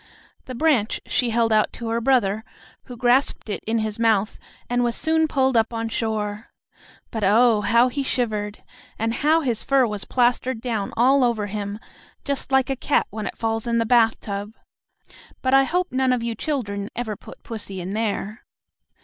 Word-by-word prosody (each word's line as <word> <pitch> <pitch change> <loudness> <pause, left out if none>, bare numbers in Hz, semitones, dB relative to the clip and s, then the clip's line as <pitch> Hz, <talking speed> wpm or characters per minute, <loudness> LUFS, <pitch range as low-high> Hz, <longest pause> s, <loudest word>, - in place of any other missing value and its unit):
The 255 - -7
branch 260 -6 +1
she 250 -3 0
held 230 -1 +2
out 215 0 +3
to 230 -1 -6
her 230 +1 0
brother, 220 -5 +2 0.4
who 245 -2 -10
grasped 245 0 +2
it - - -4
in 225 +1 +1
his 215 0 -2
mouth 220 -2 +1 0.3
and 245 0 +1
was 235 -1 0
soon 320 0 +2
pulled 265 -3 +1
up 225 0 +3
on 230 -1 -3
shore. 215 -1 -3 0.6
But, 220 -3 -3
oh, 220 +2 +4
how 235 +3 +4
he 280 +3 -2
shivered! 215 -6 -2 0.3
And 225 +1 -1
how 310 +6 +3
his 240 -7 -1
fur 270 -2 +3
was 210 -3 -4
plastered 250 0 +1
down 225 -4 -3
all 260 +3 +4
over 235 -4 +1
him, 205 0 -4 0.5
just 280 -1 -2
like 265 0 +3
a - - 0
cat 275 +3 +1
when 215 0 -4
it - - -7
falls 225 0 -2
in 235 0 +1
the 230 - +1
bathtub. 225 -3 +1 0.9
But 260 0 +1
I 270 0 +6
hope 360 +5 -1
none 260 0 +1
of 245 -2 -1
you 235 0 -2
children 205 -7 -3
ever 220 -3 -3
put - - -14
pussy 205 -4 -6
in 180 +2 -5
there. 215 0 -3
230 Hz, 185 wpm, -23 LUFS, 215-255 Hz, 0.9 s, I